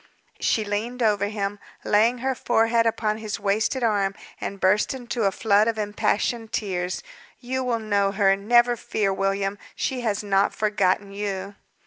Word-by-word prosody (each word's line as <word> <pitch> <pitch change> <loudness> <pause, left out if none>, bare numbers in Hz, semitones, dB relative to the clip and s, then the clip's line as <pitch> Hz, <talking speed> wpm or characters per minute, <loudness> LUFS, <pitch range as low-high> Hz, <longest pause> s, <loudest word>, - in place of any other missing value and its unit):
She 220 - +1
leaned 230 +5 -2
over 205 -2 +2
him, 205 -1 -3 0.3
laying 225 +4 +3
her 265 - +2
forehead 230 -1 +2
upon 220 -1 0
his 215 -2 -4
wasted 220 +6 0
arm, 200 -3 +1 0.2
and 200 - -5
burst 205 +7 +2
into 240 -3 -3
a 195 - +3
flood 210 +1 +3
of 230 -1 0
impassioned 215 +2 -1
tears. 180 -3 -2 0.4
"You 260 +1 -3
will 245 -2 0
know 205 -3 +1
her, 195 -1 +3
never 240 +4 +3
fear, 205 -3 -1
William; 195 +1 -1 0.2
she 255 -2 -2
has 215 -4 -1
not 200 -1 +2
forgotten 205 -2 +1
you." 200 -1 -4
210 Hz, 155 wpm, -24 LUFS, 200-230 Hz, 0.4 s, laying